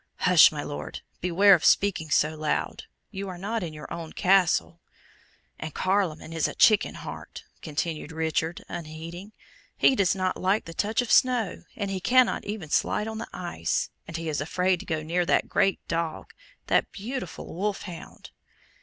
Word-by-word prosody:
"Hush, 180 -3 +7
my 145 -2 -4
Lord! 145 - -6 0.2
beware 190 +3 +5
of 170 - +3
speaking 195 -6 +3
so 150 +2 +2
loud. 155 -1 -2 0.3
You 195 -1 -5
are 180 - -7
not 215 +5 -3
in 170 -3 -4
your 150 -1 -8
own 165 -2 -7
Castle." 180 -2 +2 0.8
"And 155 -2 -6
Carloman 185 -5 0
is 165 -2 +1
a - - -7
chicken 215 -2 +4
heart," - - -8 0.2
continued 155 0 -3
Richard, 160 +1 -2
unheeding. 165 +4 -7 0.5
"He 265 - +5
does 195 -4 +2
not 185 -1 -1
like 195 +4 +1
to 165 - -8
touch 215 +8 0
snow, 245 -5 +2
and 200 -2 -3
he 190 - -2
cannot 255 +6 +3
even 200 -7 -5
slide 210 - +1
on 220 0 -5
the 230 - -6
ice, 170 - -2 0.2
and 165 - -5
he 165 0 -5
is 150 -2 -1
afraid 180 +4 +1
to - - -10
go 160 -1 -2
near 170 +3 0
that 175 - +2
great 195 - +2
dog 165 -1 -3 0.3
that - - +1
beautiful 225 -2 -6
wolf 200 +4 -2
hound." 180 -5 -10
180 Hz, 170 wpm, -26 LUFS, 160-200 Hz, 0.8 s, Hush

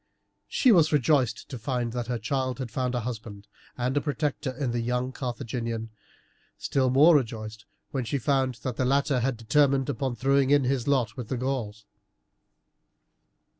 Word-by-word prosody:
She 255 - +3
was 165 -6 +5
rejoiced 135 -5 +2
to 130 -4 -6
find 120 0 -2
that 120 -2 -3
her 125 -1 -1
child 130 +2 -2
had 130 -4 -5
found 125 +1 -1
a 120 - -1
husband 110 -3 -7 0.3
and 130 +3 0
protector 145 -1 -2
in 130 -1 -3
the 120 - -1
young 125 +2 -1
Carthaginian, 115 -3 -4 0.7
still 130 -2 0
more 150 +6 +6
rejoiced 110 -5 -2 0.3
when 130 -3 -2
she 140 - -1
found 130 -1 +1
that 125 -3 -3
the - - +1
latter 140 0 +2
had 125 0 -1
determined 135 +3 +2
upon 130 -3 -2
throwing 135 +2 +2
in 145 -1 +4
his 130 -1 -1
lot 135 -4 +1
with 125 -4 -6
the 130 - -2
Gauls. 120 -5 -3
130 Hz, 165 wpm, -27 LUFS, 120-140 Hz, 0.7 s, more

